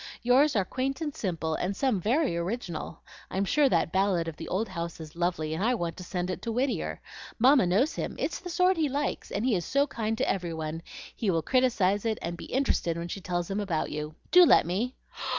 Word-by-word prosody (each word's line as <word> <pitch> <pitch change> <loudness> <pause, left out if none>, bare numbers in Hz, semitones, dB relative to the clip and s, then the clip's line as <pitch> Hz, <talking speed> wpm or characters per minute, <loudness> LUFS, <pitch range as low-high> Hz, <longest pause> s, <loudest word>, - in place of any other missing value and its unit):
Yours 260 +4 +4
are 200 -3 +2
quaint 265 - -2
and 305 -3 -3
simple 165 -5 -2
and 180 +5 -1
some 245 -5 +1
very 245 - +1
original. 175 -1 -4 0.3
I'm 195 +1 -1
sure 285 +6 +3
that 165 -4 +1
ballad 190 -3 +1
of 165 - -5
the - - -8
old 210 +5 -1
house 170 -2 -5
is 155 -1 -9
lovely, 170 -3 -1
and 160 - -2
I 245 +3 +3
want 170 -6 -3
to 185 - -7
send 180 0 -3
it - - -5
to 230 - -3
Whittier. 255 +4 -1 0.4
Mamma 255 -3 +5
knows 225 - +2
him; - - -4
it's - - -2
the 360 - -8
sort 365 +2 +3
he 310 -3 +1
likes, 285 +2 -2
and 205 +4 -2
he 255 - +3
is 175 -4 0
so 280 - +2
kind 225 -5 -2
to - - 0
every 175 -4 -1
one, 160 0 -4 0.3
he 215 - -1
will 165 -3 +1
criticise 225 -7 +2
it, 225 -2 0
and 170 - -4
be - - -9
interested 245 -10 0
when 170 +1 -4
she 195 - -5
tells 175 0 -2
him 195 - -1
about 180 -6 -1
you. 150 +1 -5 0.2
Do 360 0 +9
let - - +6
me!" 210 +10 -2
195 Hz, 230 wpm, -28 LUFS, 170-255 Hz, 0.4 s, Do